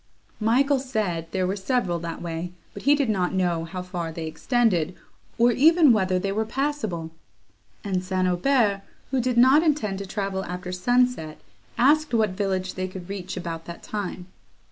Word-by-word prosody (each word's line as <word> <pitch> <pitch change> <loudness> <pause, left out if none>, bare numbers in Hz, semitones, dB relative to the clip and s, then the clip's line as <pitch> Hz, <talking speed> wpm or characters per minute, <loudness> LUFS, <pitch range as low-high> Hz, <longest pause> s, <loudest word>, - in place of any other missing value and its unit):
Michael 265 +6 +3
said, 210 -11 -2
there 185 0 -1
were 190 +2 -1
several 190 -4 0
that 170 0 -6
way, 170 +1 -4 0.2
but - - -8
he 285 +2 +5
did 285 -3 0
not 190 -4 0
know 175 -3 0
how 180 +2 -6
far 175 -2 -4
they 160 0 -5
extended, 185 - +1 0.4
or 235 +1 +5
even 310 +2 +6
whether 190 -4 +1
they 195 +2 -1
were 215 +3 0
passable; 220 - -2 0.7
and 190 -3 -1
St. 185 0 0
Aubert, 200 +2 +2 0.3
who 265 -2 +2
did 250 0 -1
not 260 +5 +7
intend 290 - 0
to 200 - -6
travel 195 -1 -2
after 180 +1 -5
sunset, 245 -4 +1 0.4
asked 295 +2 +3
what 215 -3 +2
village 190 -1 -2
they 185 0 -3
could 185 -1 -9
reach 190 -2 -5
about 165 -2 -5
that 170 - -9
time. 200 -3 -5
195 Hz, 170 wpm, -25 LUFS, 180-245 Hz, 0.7 s, not